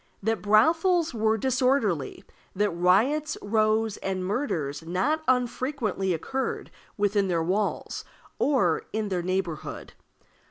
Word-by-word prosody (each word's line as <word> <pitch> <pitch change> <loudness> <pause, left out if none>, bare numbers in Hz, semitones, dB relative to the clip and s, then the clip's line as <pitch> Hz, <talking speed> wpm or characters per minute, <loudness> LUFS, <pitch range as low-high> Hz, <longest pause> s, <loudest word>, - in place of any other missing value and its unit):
That 225 +1 0
brothels 325 - +3
were 220 -1 +1
disorderly; 245 - 0 0.3
that 205 +1 +1
riots, 220 - +2
rows, 215 0 +1
and 190 -1 -3
murders 175 - -2
not 185 - 0
unfrequently 250 -5 0
occurred 260 +11 -3 0.3
within 205 -1 +1
their 170 -3 0
walls 200 +5 -2 0.4
or 220 - +2
in 215 -1 -1
their 180 -2 -1
neighborhood. 180 -3 -3
210 Hz, 110 wpm, -26 LUFS, 185-255 Hz, 0.4 s, brothels